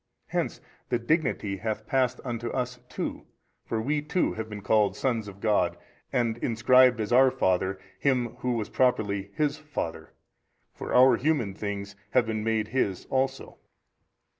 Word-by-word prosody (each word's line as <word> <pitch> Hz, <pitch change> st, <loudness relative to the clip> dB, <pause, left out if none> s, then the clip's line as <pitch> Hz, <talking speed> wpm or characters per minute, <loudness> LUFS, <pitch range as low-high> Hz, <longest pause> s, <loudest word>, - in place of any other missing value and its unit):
Hence -, -, -2 dB, 0.3 s
the 120 Hz, -, +2 dB
dignity 120 Hz, -, 0 dB
hath 110 Hz, +1 st, -3 dB
passed 130 Hz, +1 st, +1 dB
unto 120 Hz, -1 st, -3 dB
us 125 Hz, -1 st, -3 dB
too: -, -, -5 dB, 0.4 s
for 115 Hz, -, -1 dB
WE 145 Hz, +6 st, 0 dB
too 150 Hz, +4 st, 0 dB
have 110 Hz, 0 st, -5 dB
been 105 Hz, -2 st, -7 dB
called 105 Hz, -2 st, +3 dB
sons 115 Hz, -5 st, -1 dB
of 100 Hz, -1 st, -10 dB
God 100 Hz, -5 st, +1 dB, 0.3 s
and 120 Hz, -3 st, 0 dB
inscribed 125 Hz, +1 st, +4 dB
as 110 Hz, +2 st, -1 dB
our 130 Hz, +1 st, +7 dB
Father 95 Hz, -3 st, 0 dB, 0.2 s
Him 125 Hz, -4 st, +2 dB
Who 125 Hz, -2 st, 0 dB
is 105 Hz, -, -4 dB
properly 100 Hz, -6 st, +1 dB
His 150 Hz, -1 st, 0 dB
Father; 85 Hz, -, -5 dB, 0.6 s
for -, -, -7 dB
our 125 Hz, -1 st, +6 dB
human 135 Hz, -9 st, 0 dB
things 100 Hz, 0 st, -5 dB, 0.2 s
have 125 Hz, -2 st, +5 dB
been 110 Hz, -1 st, -2 dB
made 110 Hz, -1 st, 0 dB
His 100 Hz, -7 st, -1 dB
also. 130 Hz, 0 st, -1 dB
115 Hz, 155 wpm, -27 LUFS, 105-130 Hz, 0.6 s, our